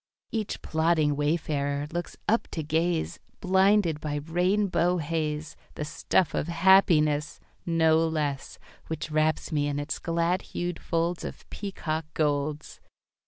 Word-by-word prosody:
Each 220 Hz, -3 st, -2 dB
plodding 160 Hz, -2 st, +2 dB
wayfarer 145 Hz, -1 st, 0 dB
looks 175 Hz, 0 st, -4 dB
up 225 Hz, +2 st, +2 dB
to 160 Hz, -, -2 dB
gaze, 160 Hz, +2 st, 0 dB, 0.2 s
Blinded 190 Hz, -3 st, +3 dB
by 150 Hz, -1 st, -3 dB
rainbow 180 Hz, +3 st, +1 dB
haze, 155 Hz, -1 st, -2 dB, 0.2 s
The 150 Hz, -, -3 dB
stuff 160 Hz, +3 st, +1 dB
of -, -, -1 dB
happiness, 165 Hz, -4 st, +4 dB, 0.3 s
No 165 Hz, -1 st, +3 dB
less, 150 Hz, -4 st, -2 dB, 0.3 s
Which 160 Hz, 0 st, -4 dB
wraps 155 Hz, +1 st, +1 dB
me 145 Hz, -2 st, +1 dB
in 145 Hz, -1 st, -2 dB
its 145 Hz, +1 st, -3 dB
glad 170 Hz, +2 st, 0 dB
hued 175 Hz, -1 st, -4 dB
folds 170 Hz, +1 st, -1 dB
Of -, -, -8 dB
peacock 160 Hz, -6 st, -4 dB
golds. 150 Hz, 0 st, -1 dB
160 Hz, 125 wpm, -27 LUFS, 150-175 Hz, 0.3 s, happiness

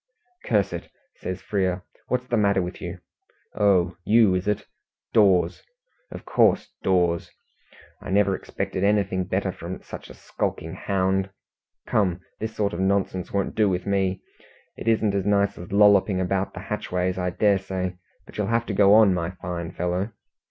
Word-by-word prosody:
"Curse 100 Hz, -5 st, +1 dB
it!" 85 Hz, -, -6 dB, 0.3 s
says 90 Hz, 0 st, -5 dB
Frere, 95 Hz, -3 st, -1 dB, 0.2 s
"What's 125 Hz, 0 st, -1 dB
the 120 Hz, -, -1 dB
matter 100 Hz, -3 st, +3 dB
with 90 Hz, -, -7 dB
you? -, -, -6 dB, 0.5 s
Oh, 95 Hz, -4 st, +2 dB
you, 110 Hz, -2 st, +5 dB
is 90 Hz, +1 st, -1 dB
it? 105 Hz, -, 0 dB, 0.5 s
Dawes! 95 Hz, -6 st, +4 dB, 0.5 s
Of -, -, -9 dB
course, -, -, +2 dB
Dawes. 90 Hz, -3 st, +1 dB, 0.7 s
I -, -, -8 dB
never 100 Hz, 0 st, +3 dB
expected 95 Hz, -, -4 dB
anything 100 Hz, -2 st, +1 dB
better 95 Hz, +1 st, -1 dB
from 90 Hz, +1 st, -8 dB
such -, -, -9 dB
a -, -, -11 dB
skulking 80 Hz, +1 st, -4 dB
hound. 95 Hz, 0 st, 0 dB, 0.6 s
Come, 95 Hz, -4 st, +1 dB, 0.2 s
this 110 Hz, 0 st, -4 dB
sort 100 Hz, -3 st, 0 dB
of 85 Hz, -, -4 dB
nonsense 95 Hz, -1 st, 0 dB
won't 100 Hz, -1 st, -1 dB
do 105 Hz, -2 st, +3 dB
with 90 Hz, -1 st, -2 dB
me. 95 Hz, -1 st, 0 dB, 0.5 s
It -, -, -8 dB
isn't 110 Hz, -2 st, +2 dB
as 100 Hz, 0 st, -1 dB
nice 100 Hz, 0 st, +2 dB
as 90 Hz, +2 st, -9 dB
lolloping 100 Hz, -1 st, +5 dB
about 95 Hz, +1 st, -1 dB
the -, -, -6 dB
hatchways, 90 Hz, +1 st, -2 dB
I 90 Hz, 0 st, 0 dB
dare 100 Hz, +2 st, +2 dB
say, 95 Hz, -1 st, -4 dB, 0.3 s
but -, -, -11 dB
you'll -, -, 0 dB
have 115 Hz, 0 st, +1 dB
to 110 Hz, -, -3 dB
go 100 Hz, +1 st, +6 dB
on, 110 Hz, -4 st, +6 dB
my 85 Hz, -1 st, -1 dB
fine 90 Hz, -2 st, -5 dB
fellow." 90 Hz, +4 st, -2 dB
95 Hz, 165 wpm, -24 LUFS, 90-100 Hz, 0.7 s, go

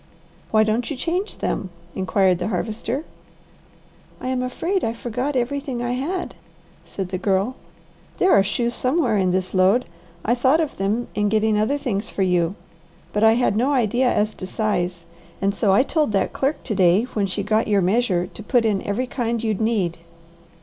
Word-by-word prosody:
"Why 215 Hz, 0 st, +4 dB
don't 220 Hz, +2 st, 0 dB
you 295 Hz, -, -4 dB
change 355 Hz, +9 st, -2 dB
them?" 190 Hz, -, -2 dB, 0.2 s
inquired 190 Hz, -1 st, +2 dB
the -, -, -2 dB
Harvester. 220 Hz, -, -2 dB, 1.2 s
"I 255 Hz, -, -4 dB
am 255 Hz, -1 st, 0 dB
afraid 335 Hz, +10 st, -1 dB
I 225 Hz, -, 0 dB
forgot 245 Hz, +4 st, -3 dB
everything 255 Hz, 0 st, -2 dB
I 240 Hz, -, -1 dB
had," 330 Hz, +9 st, -3 dB, 0.5 s
said 190 Hz, -2 st, -5 dB
the 185 Hz, -1 st, -3 dB
Girl. 195 Hz, +6 st, +1 dB, 0.6 s
"There 375 Hz, -, +3 dB
are -, -, +7 dB
shoes 235 Hz, +5 st, -1 dB
somewhere 255 Hz, -3 st, +1 dB
in 185 Hz, -1 st, +2 dB
this 185 Hz, 0 st, -1 dB
load. 195 Hz, +6 st, +4 dB, 0.4 s
I 235 Hz, -, +3 dB
thought 260 Hz, +5 st, +3 dB
of 315 Hz, -3 st, -2 dB
them 210 Hz, +5 st, -1 dB
in 210 Hz, 0 st, +1 dB
getting 220 Hz, 0 st, +2 dB
other 215 Hz, +7 st, +1 dB
things 210 Hz, -7 st, -3 dB
for 195 Hz, -, -1 dB
you, 180 Hz, 0 st, +1 dB, 0.6 s
but 210 Hz, -, +1 dB
I 220 Hz, 0 st, +7 dB
had 235 Hz, -3 st, +2 dB
no 255 Hz, +6 st, +2 dB
idea 245 Hz, 0 st, +2 dB
as 210 Hz, +1 st, +1 dB
to 185 Hz, -, -7 dB
size, 180 Hz, -5 st, -1 dB, 0.3 s
and 195 Hz, +1 st, +1 dB
so 205 Hz, -2 st, +1 dB
I 200 Hz, +6 st, +5 dB
told 300 Hz, -6 st, 0 dB
that 195 Hz, -, +1 dB
clerk 280 Hz, +2 st, -1 dB
to 225 Hz, -, -2 dB
day 185 Hz, +1 st, +4 dB
when 215 Hz, -5 st, -2 dB
she 200 Hz, +2 st, -2 dB
got 215 Hz, +2 st, +1 dB
your 205 Hz, -2 st, +3 dB
measure 190 Hz, -2 st, +2 dB
to 200 Hz, -, -11 dB
put 230 Hz, +2 st, +2 dB
in 205 Hz, -3 st, +1 dB
every 210 Hz, +6 st, -1 dB
kind 235 Hz, -2 st, -2 dB
you'd 220 Hz, -2 st, -1 dB
need." 200 Hz, -7 st, 0 dB
220 Hz, 185 wpm, -22 LUFS, 195-250 Hz, 1.2 s, are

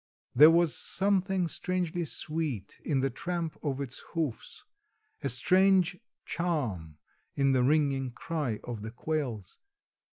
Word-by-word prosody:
There 150 Hz, +5 st, +9 dB
was 170 Hz, -1 st, +4 dB
something 190 Hz, -2 st, +1 dB
strangely 175 Hz, -1 st, -2 dB
sweet 150 Hz, -, -3 dB
in 140 Hz, -4 st, 0 dB
the 135 Hz, 0 st, 0 dB
tramp 170 Hz, +4 st, -3 dB
of 140 Hz, -3 st, -2 dB
its 135 Hz, -2 st, -4 dB
hoofs, 155 Hz, -8 st, -4 dB, 0.6 s
a 140 Hz, -, 0 dB
strange 185 Hz, +7 st, +3 dB, 0.3 s
charm 115 Hz, -, -2 dB, 0.4 s
in 140 Hz, -1 st, +3 dB
the 130 Hz, -1 st, +3 dB
ringing 135 Hz, -1 st, +2 dB
cry 125 Hz, -1 st, -3 dB
of 120 Hz, -4 st, -6 dB
the 110 Hz, -, -5 dB
quails. 125 Hz, -4 st, -4 dB
150 Hz, 125 wpm, -29 LUFS, 125-175 Hz, 0.6 s, There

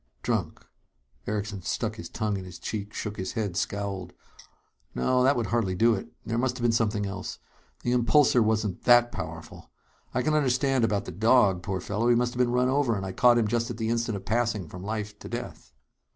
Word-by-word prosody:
"Drunk -, -, -2 dB, 0.3 s
" -, -, -38 dB
Erickson 105 Hz, -2 st, -3 dB
stuck -, -, -2 dB
his -, -, -7 dB
tongue 105 Hz, -2 st, -2 dB
in 95 Hz, -, -4 dB
his 90 Hz, -1 st, -9 dB
cheek, 105 Hz, -1 st, -5 dB
shook 105 Hz, -1 st, -5 dB
his 95 Hz, -, -4 dB
head, 105 Hz, -5 st, -2 dB
scowled. 95 Hz, -2 st, -3 dB, 0.8 s
"No, 125 Hz, -, +2 dB
that 135 Hz, +2 st, +4 dB
would 120 Hz, -, 0 dB
hardly 110 Hz, -6 st, 0 dB
do 115 Hz, +5 st, +4 dB
it. 110 Hz, +3 st, -4 dB, 0.2 s
There 115 Hz, 0 st, -1 dB
must 125 Hz, 0 st, 0 dB
have 120 Hz, -, -6 dB
been 120 Hz, -, +4 dB
something 110 Hz, -2 st, +1 dB
else. 100 Hz, -1 st, -5 dB, 0.5 s
The 120 Hz, -, 0 dB
impulsor 125 Hz, +1 st, +4 dB
isn't 105 Hz, -4 st, -2 dB
that 120 Hz, -1 st, +6 dB
powerful. 80 Hz, -3 st, -8 dB, 0.4 s
I 125 Hz, -, 0 dB
can 155 Hz, -, +1 dB
understand 135 Hz, -3 st, +2 dB
about 105 Hz, -3 st, +1 dB
the -, -, -6 dB
dog, 105 Hz, -1 st, +3 dB
poor 95 Hz, +1 st, -3 dB
fellow. 105 Hz, +6 st, 0 dB
He 120 Hz, -, +5 dB
must 120 Hz, 0 st, +1 dB
have 125 Hz, -, -6 dB
been 125 Hz, -1 st, +3 dB
run 125 Hz, +1 st, +2 dB
over, 130 Hz, -3 st, +2 dB
and 95 Hz, -1 st, -3 dB
I 95 Hz, -, -4 dB
caught 120 Hz, +4 st, +5 dB
him 115 Hz, -2 st, +2 dB
just 115 Hz, +2 st, 0 dB
at 120 Hz, -, -5 dB
the 110 Hz, -1 st, -2 dB
instant 115 Hz, -1 st, 0 dB
of 100 Hz, -1 st, -7 dB
passing 110 Hz, -5 st, 0 dB
from 90 Hz, +3 st, -9 dB
life 105 Hz, 0 st, -4 dB
to -, -, -9 dB
death." -, -, -7 dB
110 Hz, 215 wpm, -27 LUFS, 100-120 Hz, 0.8 s, that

